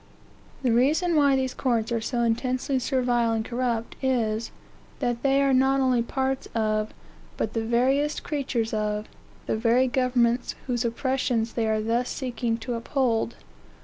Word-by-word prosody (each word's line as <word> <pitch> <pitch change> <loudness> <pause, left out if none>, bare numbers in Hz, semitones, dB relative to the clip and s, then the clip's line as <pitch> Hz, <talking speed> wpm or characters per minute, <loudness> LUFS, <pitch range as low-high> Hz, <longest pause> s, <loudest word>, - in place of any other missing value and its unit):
The 250 - +2
reason 305 +9 +3
why 285 -2 +4
these 260 -1 -1
courts 235 -3 0
are 230 -1 0
so 240 +2 -1
intensely 255 +3 0
servile 245 -3 +1
and 220 0 -1
corrupt, 235 -2 -2
is, 230 -4 0 0.5
that 240 -1 -1
they 275 0 +3
are 275 -1 +3
not 265 +1 +3
only 255 -2 +3
parts 265 +2 -2
of, 215 -1 0 0.5
but 220 - -2
the 225 - -1
veriest 265 +6 +1
creatures 260 -7 -2
of, 210 0 -1 0.4
the - - 0
very 235 +3 +3
governments 250 -1 +1
whose 245 -2 -1
oppressions 240 -1 -1
they 230 -2 0
are 215 0 +1
thus 235 +3 0
seeking 240 -3 -2
to 240 +2 -4
uphold. 235 -1 0
245 Hz, 150 wpm, -26 LUFS, 230-265 Hz, 0.5 s, why